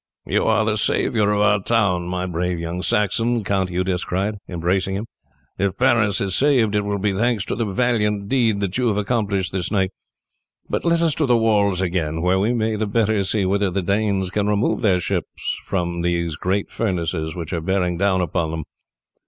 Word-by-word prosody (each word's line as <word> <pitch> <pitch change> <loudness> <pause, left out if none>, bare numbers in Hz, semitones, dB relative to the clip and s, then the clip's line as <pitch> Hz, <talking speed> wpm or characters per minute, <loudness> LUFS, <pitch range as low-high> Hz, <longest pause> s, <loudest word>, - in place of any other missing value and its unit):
"You - - 0
are 110 0 +3
the 110 -1 0
saviour 105 0 +1
of 105 0 +1
our 105 -1 +3
town, 95 -5 +1
my 90 0 -2
brave 90 0 -2
young 85 +2 -4
Saxon," 115 +4 +1
Count 95 -2 0
Eudes 90 0 -1
cried, 100 +4 -2
embracing 95 +2 -1
him. 105 +3 -3 0.5
"If 100 -1 0
Paris 115 -6 +3
is 100 -1 -1
saved 130 -7 +3
it 105 - +2
will 100 0 -1
be 100 0 0
thanks 110 0 0
to - - -3
the 115 +1 -1
valiant 105 -2 0
deed 115 -5 +1
that 100 +3 -2
you 125 - +2
have 105 -3 +1
accomplished 100 -4 -1
this 95 -2 -2
night. 95 -2 0 0.8
But - - -2
let 170 0 +2
us 165 -3 +2
to 150 0 0
the 120 -1 +4
walls 100 -4 +2
again, 80 -3 -1
where 90 +1 +2
we 105 +5 +1
may 110 -2 0
the 110 0 -1
better 110 -1 +1
see 100 +1 0
whether 100 +1 +1
the 95 +1 -2
Danes 100 -1 0
can 105 0 0
remove 105 +4 +1
their 95 -6 +3
ships - - -3
from 85 -2 -2
those 85 -2 -1
great 95 +5 -2
furnaces 85 -6 -2
which 85 -1 -5
are 85 - -1
bearing 90 0 0
down 95 -1 +2
upon 85 -1 -1
them." 80 0 -4
100 Hz, 200 wpm, -21 LUFS, 90-110 Hz, 0.8 s, the